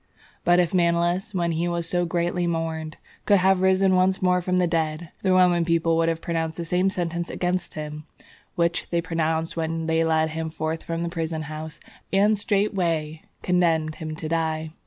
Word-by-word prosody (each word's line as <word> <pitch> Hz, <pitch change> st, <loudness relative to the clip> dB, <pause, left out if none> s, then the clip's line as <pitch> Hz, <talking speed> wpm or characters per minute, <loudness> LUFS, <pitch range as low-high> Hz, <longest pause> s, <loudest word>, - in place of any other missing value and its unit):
But 175 Hz, +1 st, +4 dB
if 180 Hz, 0 st, +2 dB
Manlius 175 Hz, +3 st, +1 dB
when 170 Hz, -2 st, +1 dB
he 165 Hz, +2 st, -1 dB
was 170 Hz, -1 st, -2 dB
so 175 Hz, +1 st, 0 dB
greatly 175 Hz, +1 st, -1 dB
mourned, 160 Hz, -2 st, -3 dB, 0.3 s
could 205 Hz, -, +6 dB
have 190 Hz, 0 st, +3 dB
risen 190 Hz, 0 st, +4 dB
once 185 Hz, +1 st, +3 dB
more 180 Hz, -1 st, +2 dB
from 180 Hz, +1 st, 0 dB
the 180 Hz, -, +3 dB
dead, 160 Hz, -1 st, -1 dB
the 190 Hz, -, +1 dB
Roman 180 Hz, -2 st, +4 dB
people 165 Hz, 0 st, +2 dB
would 165 Hz, 0 st, +2 dB
have 165 Hz, 0 st, -2 dB
pronounced 165 Hz, -1 st, -2 dB
the 170 Hz, -, -4 dB
same 180 Hz, +3 st, +2 dB
sentence 170 Hz, -2 st, -3 dB
against 180 Hz, 0 st, -2 dB
him 150 Hz, 0 st, -6 dB, 0.5 s
which 170 Hz, 0 st, 0 dB
they 170 Hz, -, +1 dB
pronounced 165 Hz, -1 st, -1 dB
when 165 Hz, 0 st, -2 dB
they 160 Hz, 0 st, +2 dB
led 160 Hz, -1 st, +2 dB
him 160 Hz, 0 st, -3 dB
forth 160 Hz, +1 st, -3 dB
from 165 Hz, 0 st, -3 dB
the 170 Hz, -, -2 dB
prison 160 Hz, -2 st, -3 dB
house, 155 Hz, +1 st, -7 dB, 0.3 s
and 205 Hz, +2 st, +4 dB
straightway 185 Hz, -7 st, -1 dB, 0.2 s
condemned 165 Hz, -3 st, +2 dB
him 155 Hz, -1 st, -4 dB
to 160 Hz, 0 st, -6 dB
die. 160 Hz, -1 st, -1 dB
170 Hz, 185 wpm, -24 LUFS, 160-180 Hz, 0.5 s, could